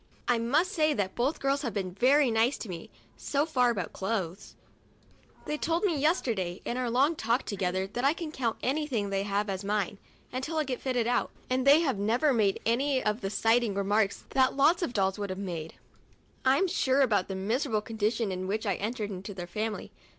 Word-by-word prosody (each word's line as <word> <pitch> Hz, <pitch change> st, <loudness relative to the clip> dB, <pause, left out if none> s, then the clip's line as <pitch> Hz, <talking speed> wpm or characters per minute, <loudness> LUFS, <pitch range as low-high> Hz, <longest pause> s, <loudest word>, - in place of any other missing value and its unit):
I 245 Hz, -2 st, +3 dB
must 300 Hz, -, +2 dB
say 310 Hz, -6 st, +2 dB
that 195 Hz, -3 st, -1 dB
both 265 Hz, +6 st, 0 dB
girls 275 Hz, +1 st, +1 dB
have 235 Hz, -8 st, -4 dB
been 190 Hz, -3 st, -2 dB
very 265 Hz, +5 st, +4 dB
nice 225 Hz, +5 st, +2 dB
to 225 Hz, -, -7 dB
me 170 Hz, -2 st, -7 dB, 0.3 s
so 285 Hz, +1 st, 0 dB
far 250 Hz, -6 st, +2 dB
about 195 Hz, -8 st, -2 dB
clothes. 190 Hz, -3 st, -3 dB, 0.9 s
They 300 Hz, 0 st, -3 dB
told 335 Hz, +3 st, 0 dB
me 370 Hz, -6 st, +2 dB
yesterday, 235 Hz, -, 0 dB
in 240 Hz, -, -2 dB
our 250 Hz, -1 st, -1 dB
long 275 Hz, +7 st, +3 dB
talk 235 Hz, 0 st, 0 dB
together, 190 Hz, -2 st, -1 dB
that 240 Hz, +6 st, -5 dB
I 280 Hz, +2 st, +4 dB
can 330 Hz, -3 st, -6 dB
count 240 Hz, -7 st, -2 dB
anything 260 Hz, -7 st, -1 dB
they 195 Hz, 0 st, 0 dB
have 200 Hz, +1 st, -1 dB
as 195 Hz, 0 st, -3 dB
mine, 205 Hz, -1 st, -1 dB, 0.3 s
until 265 Hz, +6 st, -3 dB
I 310 Hz, -, +2 dB
get 260 Hz, -3 st, -4 dB
fitted 250 Hz, -3 st, 0 dB
out, 245 Hz, +1 st, +1 dB, 0.2 s
and 260 Hz, +1 st, +1 dB
they 290 Hz, +4 st, +8 dB
have 270 Hz, -11 st, 0 dB
never 240 Hz, +8 st, +2 dB
made 210 Hz, -5 st, +2 dB
any 260 Hz, +3 st, +1 dB
of 210 Hz, +2 st, 0 dB
the 195 Hz, -, -2 dB
slighting 225 Hz, 0 st, +2 dB
remarks 200 Hz, +1 st, +1 dB
that 260 Hz, -1 st, +3 dB
lots 310 Hz, +6 st, +4 dB
of 300 Hz, -8 st, -2 dB
dolls 195 Hz, -1 st, +1 dB
would 200 Hz, -1 st, -3 dB
have 185 Hz, -, -4 dB
made, 170 Hz, -5 st, -5 dB, 0.7 s
I'm 270 Hz, +9 st, +4 dB
sure, 275 Hz, -6 st, +2 dB
about 210 Hz, -8 st, +2 dB
the 195 Hz, -, -4 dB
miserable 215 Hz, +3 st, 0 dB
condition 220 Hz, 0 st, -1 dB
in 185 Hz, 0 st, -3 dB
which 215 Hz, +3 st, -2 dB
I 195 Hz, -4 st, 0 dB
entered 215 Hz, 0 st, -3 dB
into 195 Hz, +1 st, -7 dB
their 175 Hz, -2 st, -5 dB
family. 215 Hz, +4 st, -4 dB
230 Hz, 205 wpm, -29 LUFS, 200-275 Hz, 0.9 s, they